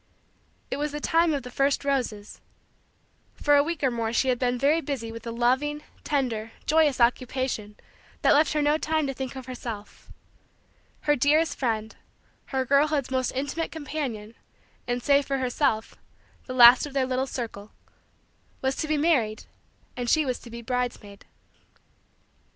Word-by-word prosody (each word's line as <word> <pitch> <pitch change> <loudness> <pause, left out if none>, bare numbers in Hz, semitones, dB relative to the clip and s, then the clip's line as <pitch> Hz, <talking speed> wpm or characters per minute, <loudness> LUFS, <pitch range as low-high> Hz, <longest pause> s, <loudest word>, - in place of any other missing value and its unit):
It - - -1
was 295 +1 -2
the 295 - -3
time 330 +2 +2
of 285 -4 -2
the 250 - -9
first 275 +2 +1
roses. 240 -7 -2 0.9
For 290 0 +3
a 285 - +6
week 320 0 -3
or 265 - +3
more 230 -1 -2
she 260 +3 +1
had 250 -1 +1
been 250 -1 0
very 290 +6 +2
busy 260 -7 -4
with 230 +1 -9
a - - -3
loving, 260 +6 0 0.2
tender, 230 -6 -2
joyous, 305 -3 +3
occupation 245 -3 0 0.5
that - - +6
left 305 +2 +3
her 300 -1 +1
no 295 +1 +2
time 315 -1 0
to 270 - -2
think 265 0 -6
of 260 -1 -7
herself. 235 -5 -8 0.9
Her 295 - +2
dearest 300 +5 +2
friend 220 -4 -2 0.5
her 265 -1 -2
girlhood's 280 0 +2
most 260 -1 0
intimate 285 +5 -2
companion, 275 -8 -5 0.5
and, 245 0 -2
save 280 -1 +3
for 275 - 0
herself, 255 -3 0 0.5
the 255 - -5
last 245 +3 +8
of 285 - -11
their 270 -2 +1
little 260 +1 -1
circle 220 -5 -6 0.9
was 265 0 -1
to 310 - -2
be 305 0 +1
married 270 -9 +1 0.5
and 245 -1 -3
she 310 +2 +3
was 255 -2 -2
to 235 - -13
be 235 0 -8
bridesmaid. 240 -5 -4
260 Hz, 160 wpm, -26 LUFS, 235-290 Hz, 0.9 s, last